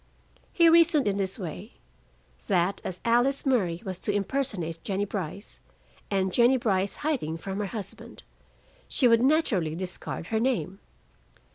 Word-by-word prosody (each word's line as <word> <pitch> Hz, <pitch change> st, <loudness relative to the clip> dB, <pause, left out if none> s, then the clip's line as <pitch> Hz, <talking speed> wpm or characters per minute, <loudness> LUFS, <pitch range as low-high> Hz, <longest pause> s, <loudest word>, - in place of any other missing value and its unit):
He 335 Hz, -1 st, +5 dB
reasoned 330 Hz, -5 st, +5 dB
in 200 Hz, -1 st, 0 dB
this 195 Hz, -1 st, -2 dB
way: 175 Hz, -, -7 dB, 0.7 s
That 180 Hz, +3 st, +1 dB
as 180 Hz, -1 st, -5 dB
Alice 245 Hz, +5 st, +2 dB
Murray 190 Hz, -10 st, +1 dB
was 185 Hz, -2 st, -5 dB
to -, -, -2 dB
impersonate 200 Hz, -, -2 dB
Jennie 200 Hz, 0 st, -1 dB
Brice, 195 Hz, 0 st, -6 dB, 0.5 s
and 190 Hz, -2 st, 0 dB
Jennie 245 Hz, +2 st, +5 dB
Brice 200 Hz, -5 st, 0 dB
hiding 205 Hz, -, -1 dB
from 195 Hz, +4 st, -5 dB
her 205 Hz, -, -1 dB
husband, 200 Hz, -3 st, -8 dB, 0.6 s
she 260 Hz, -, +3 dB
would 230 Hz, -1 st, +5 dB
naturally 240 Hz, -, +2 dB
discard 180 Hz, -2 st, -5 dB
her 220 Hz, -, +3 dB
name. 225 Hz, -6 st, -1 dB
200 Hz, 140 wpm, -27 LUFS, 185-250 Hz, 0.7 s, He